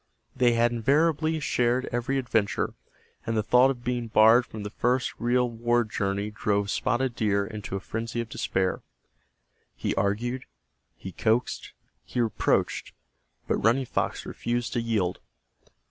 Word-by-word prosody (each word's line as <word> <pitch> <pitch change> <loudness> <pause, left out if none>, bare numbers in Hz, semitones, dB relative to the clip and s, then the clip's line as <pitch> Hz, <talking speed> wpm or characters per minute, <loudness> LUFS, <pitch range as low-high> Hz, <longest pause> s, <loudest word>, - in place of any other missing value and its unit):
They 120 -1 +4
had 120 +1 +3
invariably 155 +6 +2
shared 125 -2 +1
every 120 +3 -1
adventure, 115 -6 0 0.5
and 115 0 -2
the 110 - +1
thought 125 +4 +5
of 125 -3 -4
being 120 -1 -2
barred 115 +3 +5
from 110 -2 -7
the 105 - -5
first 125 +3 0
real 125 +1 +2
war 120 +1 +1
journey 100 -1 -2
drove 100 -1 0
Spotted 125 0 0
Deer 100 -3 +1
into 105 -2 -6
a - - -1
frenzy 115 +4 -4
of 115 - -2
despair. 95 -4 -1 0.9
He - - -2
argued, 120 +6 -1 0.5
he 95 - -8
coaxed, 115 +6 -1 0.3
he - - -5
reproached, 115 -3 0 0.5
but - - +1
Running 120 +5 +3
Fox - - -2
refused 120 0 -3
to 120 - 0
yield. 105 -6 -1
115 Hz, 145 wpm, -27 LUFS, 105-125 Hz, 0.9 s, thought